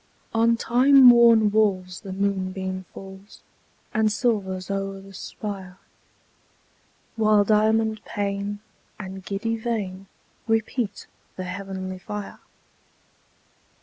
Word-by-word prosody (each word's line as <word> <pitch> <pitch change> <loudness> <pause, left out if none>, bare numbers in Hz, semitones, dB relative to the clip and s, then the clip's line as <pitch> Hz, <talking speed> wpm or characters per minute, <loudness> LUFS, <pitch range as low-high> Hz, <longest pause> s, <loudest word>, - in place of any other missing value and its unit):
On 230 +1 +3
time 260 +3 +6
worn 230 -3 +6
walls 190 -4 +1
the 195 -3 -8
moonbeam 190 -1 -2
falls, 195 +1 -12 0.5
And 215 -1 +2
silvers 200 -5 -1
o'er 195 0 -3
the 195 0 -14
spire, 190 -2 -7 1.4
While 215 -2 +4
diamond 220 +1 +2
pane 200 0 -3 0.4
and 190 -1 -7
giddy 225 +4 -2
vane 200 -5 -4 0.4
Repeat 225 -1 -1 0.3
the 185 - -5
heavenly 185 0 -6
fire. 210 +2 -7
200 Hz, 95 wpm, -24 LUFS, 190-220 Hz, 1.4 s, time